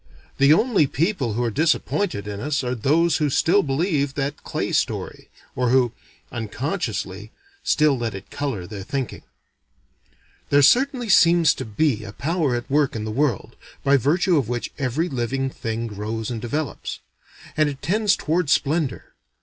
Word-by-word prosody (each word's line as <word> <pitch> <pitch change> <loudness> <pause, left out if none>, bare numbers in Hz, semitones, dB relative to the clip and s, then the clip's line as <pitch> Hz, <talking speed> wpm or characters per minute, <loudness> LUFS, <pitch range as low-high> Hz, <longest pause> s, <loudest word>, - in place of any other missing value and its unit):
The 140 +1 +6
only 200 - +4
people 145 - -1
who 120 +3 -1
are 115 - 0
disappointed 160 - 0
in 100 -1 -5
us 145 +3 -1
are 125 0 -1
those 155 +8 +2
who 150 -1 +1
still 175 +8 +3
believe 145 -2 0
that 145 +1 -3
clay - - -3
story. - - -2 0.3
Or 125 -1 +1
who 125 -2 +3 0.4
unconsciously 110 - -4 0.3
still 150 -3 +3
let 115 -4 -3
it 95 - -10
color 135 -11 -3
their 100 +1 -7
thinking. 130 +5 -4 1.3
There 145 0 +5
certainly 255 - +3
seems 170 -4 +5
to - - -6
be 110 +1 0
a 100 - -8
power 155 - 0
at 120 0 -4
work 145 -2 +1
in 110 - -3
the 110 - -3
world, 130 -2 -1 0.3
by 140 0 +4
virtue 160 +7 +2
of 130 -6 0
which 120 -1 -3
every 140 +5 0
living 135 -1 -2
thing 115 -1 -4
grows 110 +1 -4
and 115 -2 -4
develops. 145 +5 -4 0.6
And 155 -2 +3
it 140 -1 -8
tends 205 +5 +2
toward 165 0 -1
splendor. 145 -2 0
140 Hz, 160 wpm, -23 LUFS, 115-160 Hz, 1.3 s, The